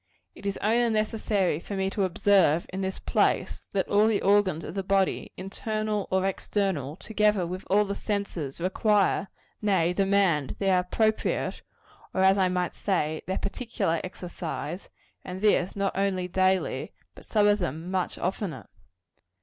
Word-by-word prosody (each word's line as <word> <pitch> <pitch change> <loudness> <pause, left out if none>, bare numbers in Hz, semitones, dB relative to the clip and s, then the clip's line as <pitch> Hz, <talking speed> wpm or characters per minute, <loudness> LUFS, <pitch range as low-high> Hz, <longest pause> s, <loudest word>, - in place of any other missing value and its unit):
It 200 - -7
is 200 - -2
only 235 +3 +3
necessary 215 -6 0
for 200 - -6
me 190 0 -1
to 200 -1 +1
observe, 180 -3 +3
in 190 - -3
this 190 0 -2
place, - - 0
that 195 -1 0
all 210 +2 +4
the 215 -3 +1
organs 195 -5 +3
of - - -6
the 195 - -2
body, 195 0 0
internal 215 +2 -3
or 190 0 +1
external, 190 -7 -1
together 210 -1 +1
with 185 +2 -5
all 210 +2 +3
the 200 - -3
senses, 200 -10 -3
require, 195 +2 +2 0.3
nay, 185 -5 +2
demand, 195 -7 +2
their 190 -2 +3
appropriate 215 +4 0 0.5
or, 190 - +2
as 190 +1 +5
I 185 -1 +3
might 180 -1 -1
say, 160 -6 -1
their 190 - -1
particular 200 -5 -2
exercise; 180 -1 -6 0.3
and 185 0 -6
this, 195 -3 +2
not 200 -1 -1
only 190 -2 0
daily, 185 +1 0 0.2
but - - -14
some 210 -2 +3
of 205 0 +4
them 170 +1 -4
much 185 -2 -1
oftener. 190 -1 -3
195 Hz, 155 wpm, -27 LUFS, 180-205 Hz, 0.5 s, as